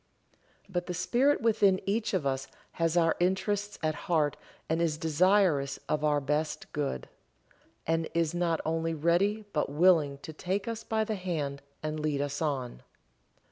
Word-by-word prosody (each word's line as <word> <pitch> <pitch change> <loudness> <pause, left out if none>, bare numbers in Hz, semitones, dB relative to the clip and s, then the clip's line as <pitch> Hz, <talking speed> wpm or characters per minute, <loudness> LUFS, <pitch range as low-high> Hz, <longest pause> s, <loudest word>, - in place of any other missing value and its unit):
But 180 -2 -3
the 180 - -3
Spirit 245 - +2
within 205 -4 +4
each 210 0 0
of 170 -6 -1
us 135 0 -1 0.2
has 165 0 0
our 165 -1 +4
interests 200 +3 0
at 155 0 +1 0.2
heart 155 -4 +2 0.3
and 160 +1 0
is 160 -3 +1
desirous 165 -3 +3
of 150 0 0
our 150 -1 +3
best 150 +2 -2
good, 140 - -2 0.8
and 165 0 0
is 165 -1 +1
not 175 -2 +1
only 165 0 0
ready 185 +7 +1
but 150 - 0
willing 150 -2 +4
to 160 - -7
take 190 +6 -2
us 225 -1 -4
by 220 0 0
the 220 - -2
hand 155 -8 -3 0.2
and 155 0 -2
lead 150 -2 -1
us 145 +1 -2
on. 130 - -2
165 Hz, 160 wpm, -29 LUFS, 150-190 Hz, 0.8 s, within